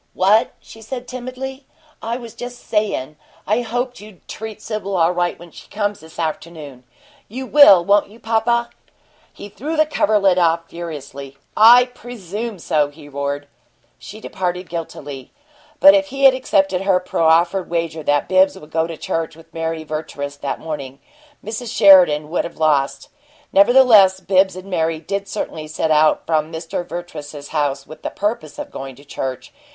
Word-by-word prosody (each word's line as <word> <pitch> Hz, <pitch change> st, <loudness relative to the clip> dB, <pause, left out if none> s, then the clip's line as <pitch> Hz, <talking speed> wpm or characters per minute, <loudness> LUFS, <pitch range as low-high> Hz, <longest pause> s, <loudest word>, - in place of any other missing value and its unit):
"What?" 205 Hz, +4 st, +3 dB
she 225 Hz, -, -15 dB
said, 245 Hz, +2 st, -7 dB
timidly. 255 Hz, +2 st, -7 dB, 0.3 s
"I 230 Hz, +2 st, -3 dB
was 235 Hz, -3 st, -10 dB
just 245 Hz, 0 st, -9 dB
sayin' 200 Hz, -, -2 dB, 0.3 s
I 215 Hz, +4 st, +1 dB
hoped 245 Hz, +2 st, -3 dB
you'd 210 Hz, -3 st, -15 dB
treat 220 Hz, -1 st, -7 dB
Sibyl 205 Hz, -3 st, -4 dB
all 165 Hz, 0 st, +3 dB
right 175 Hz, 0 st, -1 dB
when 170 Hz, 0 st, -14 dB
she -, -, -14 dB
comes, 205 Hz, -1 st, -2 dB
this 160 Hz, 0 st, -15 dB
afternoon. 155 Hz, -5 st, -6 dB, 0.4 s
You 260 Hz, +5 st, -6 dB
will, 205 Hz, -12 st, +7 dB
won't 200 Hz, +1 st, +3 dB
you, 220 Hz, +3 st, -16 dB
papa?" 235 Hz, +1 st, 0 dB, 0.6 s
He -, -, -10 dB
threw 300 Hz, +10 st, -5 dB
the 310 Hz, -, +4 dB
coverlet 200 Hz, -10 st, +2 dB
off 165 Hz, -1 st, +1 dB
furiously. 140 Hz, -5 st, -8 dB, 0.2 s
"I 240 Hz, +3 st, +8 dB
presume 230 Hz, -3 st, -7 dB
so!" 150 Hz, -3 st, 0 dB
he 145 Hz, 0 st, -15 dB
roared. 140 Hz, 0 st, -4 dB, 0.5 s
She 215 Hz, -, -10 dB
departed 180 Hz, -3 st, -4 dB
guiltily. 145 Hz, -5 st, -7 dB, 0.5 s
But 290 Hz, 0 st, +9 dB
if 295 Hz, -1 st, +2 dB
he 275 Hz, -1 st, -5 dB
had 270 Hz, -1 st, +8 dB
accepted 195 Hz, -7 st, +1 dB
her 195 Hz, -2 st, +2 dB
proffered 170 Hz, +1 st, +1 dB
wager 165 Hz, -1 st, -2 dB
that 145 Hz, -1 st, +1 dB
Bibbs 190 Hz, +1 st, +3 dB
would 150 Hz, +1 st, -14 dB
go 160 Hz, 0 st, 0 dB
to 165 Hz, -1 st, -7 dB
church 165 Hz, -1 st, -3 dB
with 165 Hz, 0 st, -18 dB
Mary 165 Hz, -1 st, -3 dB
Vertrees 145 Hz, -2 st, -6 dB
that 140 Hz, -, -4 dB
morning, 140 Hz, -4 st, -6 dB, 0.5 s
Mrs. 220 Hz, +2 st, -5 dB
Sheridan 160 Hz, -6 st, +6 dB
would 180 Hz, -, 0 dB
have 170 Hz, -, -8 dB
lost. 150 Hz, -3 st, 0 dB, 0.4 s
Nevertheless, 200 Hz, -3 st, +6 dB
Bibbs 190 Hz, -1 st, +2 dB
and 185 Hz, +1 st, -9 dB
Mary 165 Hz, -3 st, -1 dB
did 200 Hz, +5 st, -4 dB
certainly 160 Hz, -6 st, -5 dB
set 155 Hz, +1 st, -2 dB
out 155 Hz, 0 st, +3 dB
from 155 Hz, -1 st, 0 dB
Mr. 165 Hz, +1 st, -4 dB
Vertrees's 155 Hz, -5 st, -8 dB
house 145 Hz, -3 st, -1 dB
with 155 Hz, -, -12 dB
the -, -, -3 dB
purpose 205 Hz, -7 st, -3 dB
of -, -, -7 dB
going 135 Hz, -1 st, -8 dB
to 140 Hz, +3 st, -17 dB
church. 135 Hz, -2 st, -6 dB
180 Hz, 165 wpm, -19 LUFS, 155-220 Hz, 0.6 s, But